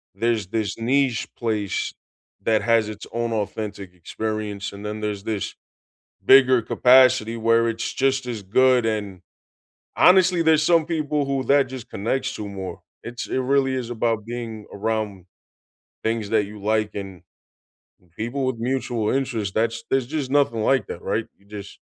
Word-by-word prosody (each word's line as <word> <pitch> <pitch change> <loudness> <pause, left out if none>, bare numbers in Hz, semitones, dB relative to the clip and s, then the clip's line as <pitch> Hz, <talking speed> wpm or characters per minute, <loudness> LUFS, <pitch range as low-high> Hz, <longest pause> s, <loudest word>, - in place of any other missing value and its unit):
there's 115 -2 0
this 110 -1 -2
niche 125 +1 +1
place 110 -4 -2 0.5
that 110 -1 +2
has 115 -2 +2
its 105 0 -8
own 120 0 -2
authentic 105 -3 -4
experience, 105 +3 -4
and 100 +1 -9
then 105 +1 -4
there's 105 -2 -3
this 110 -4 -3 0.7
bigger 130 -2 +6
capacity 125 -2 +4
where 115 +1 +3
it's 115 0 -2
just 135 -1 +1
as 115 -4 -4
good, 125 +4 +3
and 105 -4 -3 0.7
honestly, 180 -1 +5
there's 160 -1 +4
some 165 -1 +4
people 150 -3 -1
who 135 -1 -1
that 140 +1 +4
just 130 -2 -9
connects 130 +6 -2
to 105 - -5
more, 95 -2 -7 0.2
it's 120 +1 -6
it - - -1
really 135 0 +2
is 125 -3 -4
about 115 -2 -1
being 115 -2 -6
around 105 -3 -3 0.8
things 110 -2 -1
that 110 -2 +3
you 105 +1 -10
like 110 0 0
and 95 -3 -7 0.9
people 120 +6 -2
with 130 -2 -1
mutual 120 -3 -1
interest 120 -7 -1
that's 115 +1 0
there's 135 -2 +1
just 145 -2 -3
nothing 135 -6 +2
like 135 +4 +2
that, - - -7
right? - - -2
You 100 - -27
just 100 -1 -9
115 Hz, 155 wpm, -23 LUFS, 105-130 Hz, 0.9 s, bigger